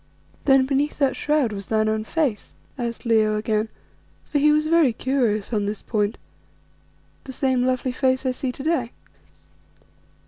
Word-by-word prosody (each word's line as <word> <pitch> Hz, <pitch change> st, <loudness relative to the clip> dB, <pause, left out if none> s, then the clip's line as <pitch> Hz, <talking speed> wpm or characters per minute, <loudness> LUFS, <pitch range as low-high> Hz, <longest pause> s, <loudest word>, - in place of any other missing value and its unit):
"Then 270 Hz, -2 st, +5 dB
beneath 280 Hz, +2 st, 0 dB
that 275 Hz, -3 st, +1 dB
shroud 295 Hz, -7 st, +1 dB
was 195 Hz, -1 st, -7 dB
thine 215 Hz, -1 st, +1 dB
own 215 Hz, 0 st, -1 dB
face," 280 Hz, -7 st, -2 dB, 0.2 s
asked 235 Hz, -1 st, -5 dB
Leo 215 Hz, -2 st, +3 dB
again, 215 Hz, 0 st, -1 dB, 0.5 s
for 290 Hz, -, -1 dB
he 300 Hz, +1 st, +5 dB
was 305 Hz, +1 st, +2 dB
very 315 Hz, -6 st, +4 dB
curious 235 Hz, -4 st, -1 dB
on 205 Hz, -2 st, 0 dB
this 210 Hz, 0 st, -4 dB
point, 210 Hz, -1 st, -1 dB, 1.1 s
"the 265 Hz, -, -7 dB
same 260 Hz, -1 st, +1 dB
lovely 255 Hz, 0 st, 0 dB
face 260 Hz, +1 st, 0 dB
I 260 Hz, -, +2 dB
see 255 Hz, 0 st, -3 dB
to 270 Hz, -, -9 dB
day?" 305 Hz, -7 st, 0 dB
255 Hz, 160 wpm, -23 LUFS, 215-275 Hz, 1.1 s, Then